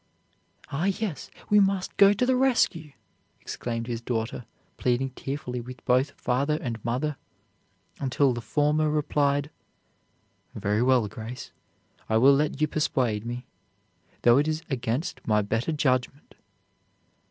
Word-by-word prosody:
"Ah, 150 +5 -1
yes, 195 - -2 0.2
we 210 - +7
must 195 -2 +1
go 200 0 +8
to 205 +5 +1
the 260 0 +3
rescue," 230 - +1 0.5
exclaimed 115 -1 -4
his 115 -1 -4
daughter, 115 0 -3 0.3
pleading 130 +1 0
tearfully 130 -2 -5
with 125 +1 -11
both 130 +3 +1
father 140 +5 +1
and 115 -4 -5
mother, 135 +5 -1 0.8
until 135 0 +2
the 120 - -4
former 150 +4 +1
replied: 145 -1 +1 1.0
"Very 105 +2 0
well, 125 -3 +3
Grace, 115 +5 -8 0.6
I 110 - +3
will 135 +5 +7
let 145 0 0
you 155 - +3
persuade 125 -8 0
me, 120 +1 -5 0.8
though 120 +2 +6
it 150 - +1
is 155 +1 -2
against 130 +2 -2
my 105 -1 +3
better 115 +8 -1
judgment." 135 -2 -1
135 Hz, 130 wpm, -26 LUFS, 120-150 Hz, 1.0 s, go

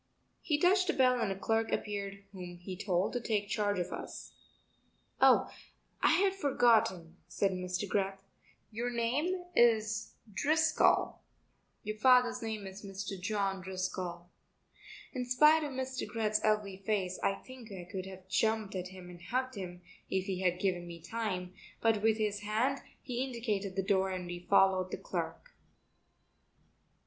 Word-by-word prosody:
He 295 - +1
touched 370 +3 +4
a - - +3
bell 255 -2 +4
and 195 - 0
a 195 - -3
clerk 225 +3 0
appeared 200 -1 -3
whom 180 -2 -8
he 185 +2 -7
told 185 0 0
to 245 - -1
take 210 -3 -1
charge 205 -1 +1
of 180 0 -2
us. - - -7 0.9
"Oh, - - +6 0.5
I - - +5
had 385 0 +3
forgotten," 225 - +2
said 200 -1 +1
Mr. 180 +1 -3
Greth, 195 0 0 0.5
"your 235 +3 -2
name 275 +11 0
is 220 -2 +3 0.2
Driscoll; 310 +9 +3 0.6
your 215 +1 -4
father's 250 +1 +5
name 220 -3 -4
is 190 +2 -9
Mr. 195 -1 -5
John 195 -1 -1
Driscoll." 185 -1 -4 0.8
In 255 -2 -2
spite 300 +6 +5
of 295 - -2
Mr. 260 0 -3
Greth's 215 -2 0
ugly 210 -3 +1
face 190 -2 -1
I 195 - +2
think 250 -1 -12
I 185 -2 -6
could 190 -2 -4
have 190 -1 -11
jumped 220 +1 +1
at 185 -1 -3
him 185 -1 -11
and 175 -1 -11
hugged 255 +7 -2
him 180 -3 -7 0.3
if 190 -1 0
he 190 -2 -2
had 180 -1 +2
given 180 -3 0
me 170 -1 -8
time, 185 -2 -3 0.3
but 225 -2 +2
with 220 0 +3
his 210 -2 0
hand 220 +7 0 0.2
he 250 -1 -2
indicated 215 -7 -2
the 195 - 0
door 190 -1 +2
and 185 -1 -3
we 175 0 -5
followed 190 -2 +4
the - - -4
clerk. - - -5
205 Hz, 155 wpm, -32 LUFS, 185-235 Hz, 0.9 s, Oh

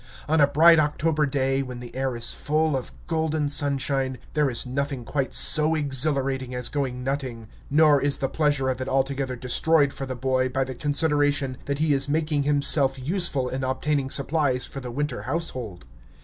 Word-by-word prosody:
On 155 0 +2
a 145 - +6
bright 165 +3 +5
October 150 0 0
day, 135 0 0
when 125 -2 -7
the 120 -1 -11
air 130 -1 -2
is 120 0 +3
full 155 0 0
of 130 - -5
golden 160 -3 -1
sunshine, 135 -2 +1 0.2
there 150 -2 +1
is 120 - -3
nothing 135 -1 -4
quite 135 0 -2
so 155 +1 +5
exhilarating 135 -3 -1
as 125 -1 -1
going 130 -3 -3
nutting. 130 -4 -4 0.2
Nor 150 -1 +4
is 140 0 +1
the 135 - -1
pleasure 145 -1 0
of 130 0 -2
it 130 - -4
altogether 135 -1 -1
destroyed 140 +4 +1
for 135 - -6
the 130 - -5
boy 130 +1 0
by 135 +1 -1
the 130 0 -6
consideration 145 -1 +1
that 140 0 -2
he 155 0 +1
is 135 +1 0
making 155 -1 0
himself 140 -1 +2
useful 145 -2 0
in 130 +1 -4
obtaining 135 +1 -1
supplies 140 -2 0
for 135 - -7
the 125 -2 -7
winter 140 +1 -3
household. 125 - -5
140 Hz, 180 wpm, -24 LUFS, 130-150 Hz, 0.2 s, a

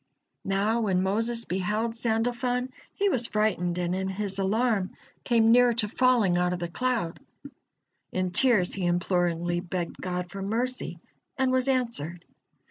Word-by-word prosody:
Now 205 +4 +1
when 190 -4 +1
Moses 230 +4 -1
beheld 210 +5 -1
Sandalfon, 245 +2 -1 0.3
he 405 - +1
was 245 -9 +1
frightened, 185 -5 0
and 175 0 -1
in 190 +1 -1
his 195 0 -3
alarm 205 0 0 0.3
came 230 -2 +4
near 245 0 +5
to 220 -2 +1
falling 220 -6 +3
out 180 0 +1
of - - -2
the 175 - -3
cloud. 230 -5 -1 0.9
In 185 -1 -1
tears 210 -3 +3
he 185 -3 -1
imploringly 175 -1 0
begged 175 -1 -4
God 180 -1 -3
for 195 - -6
mercy, 225 -3 -2 0.4
and 260 -1 +2
was 255 0 +1
answered. 230 - 0
205 Hz, 145 wpm, -27 LUFS, 180-240 Hz, 0.9 s, near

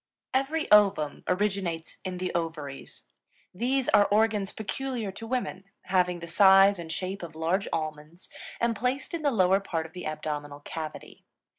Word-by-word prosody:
Every 290 +5 0
ovum 200 -8 +4
originates 185 -4 -1
in 185 -1 -4
the 185 0 -3
ovaries. 160 -5 -5 0.5
These 250 +6 0
are 205 - +5
organs 210 -2 +2
peculiar 230 0 -4
to 225 +4 -8
women, 240 -6 -3 0.2
having 180 -1 +1
the 170 - -6
size 195 +2 +6
and 165 -1 -6
shape 190 +3 -3
of 165 -2 -8
large 170 +5 0
almonds, 155 +2 -5 0.3
and 235 -1 +1
placed 250 +8 -2
in 335 - -2
the 295 - +2
lower 190 -5 +3
part 165 -5 -3
of 160 - -12
the 180 -2 -6
abdominal 150 -2 -5
cavity. 155 +1 -7
190 Hz, 155 wpm, -28 LUFS, 165-215 Hz, 0.5 s, size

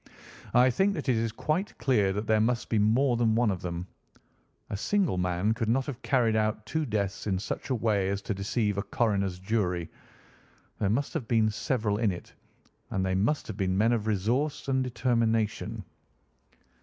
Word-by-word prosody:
I 125 +1 +6
think 195 +10 +2
that - - -5
it 125 - +4
is 115 0 0
quite 155 - -2
clear 115 -6 +2
that 105 +3 -3
there 110 0 +3
must 120 +1 0
be 110 - +2
more 120 +5 +3
than 115 -2 +2
one 115 -2 +3
of 95 - -4
them. 85 0 -4 0.9
A - - -1
single 170 - +1
man 90 +4 +1
could 115 -1 -2
not 130 +3 +2
have 130 -3 -6
carried 120 -5 +2
out 110 0 0
two 155 +6 -2
deaths 100 -2 -2
in 95 -2 +1
such 100 - -5
a 130 - +1
way 105 -4 +1
as 100 0 -2
to - - -2
deceive 100 +1 -1
a - - +1
coroner's 100 -3 0
jury. 90 -4 -1 0.9
There 100 - +1
must 135 +7 0
have 145 -9 -3
been 110 -2 +3
several 105 -2 -1
in 110 -4 +2
it, 90 - -9 0.6
and 95 -1 -1
they 95 - 0
must 110 +11 +1
have - - -7
been 95 -2 0
men 115 +4 +3
of 110 -2 -1
resource 120 +10 0
and 130 -1 +1
determination. 115 -3 0
110 Hz, 190 wpm, -28 LUFS, 100-120 Hz, 0.9 s, I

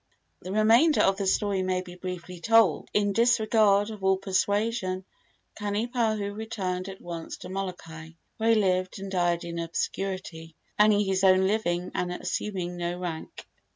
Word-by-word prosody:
The 185 - -7
remainder 230 +9 +4
of 195 0 +3
the 200 -1 -2
story 200 0 +1
may 185 0 0
be 180 -1 -11
briefly 180 0 -7
told. 225 -4 +3
In 205 -1 +1
disregard 220 -2 +3
of 210 -3 -9
all 190 0 +3
persuasion, 195 0 -1 0.5
Kanipahu 215 -1 -1
returned 195 -4 -4
at 195 0 -9
once 170 -2 -7
to 180 - -10
Molokai, 165 -4 -6 0.2
where 225 0 +1
he 230 - +6
lived 185 -3 +1
and 195 0 -7
died 175 -2 +1
in 170 0 -5
obscurity, 170 -1 -4 0.2
earning 210 -1 +5
his 190 0 0
own 190 0 +5
living 180 -4 0
and 180 0 -2
assuming 180 -1 -3
no 175 0 -3
rank. 175 -3 -6
190 Hz, 155 wpm, -27 LUFS, 180-210 Hz, 0.5 s, he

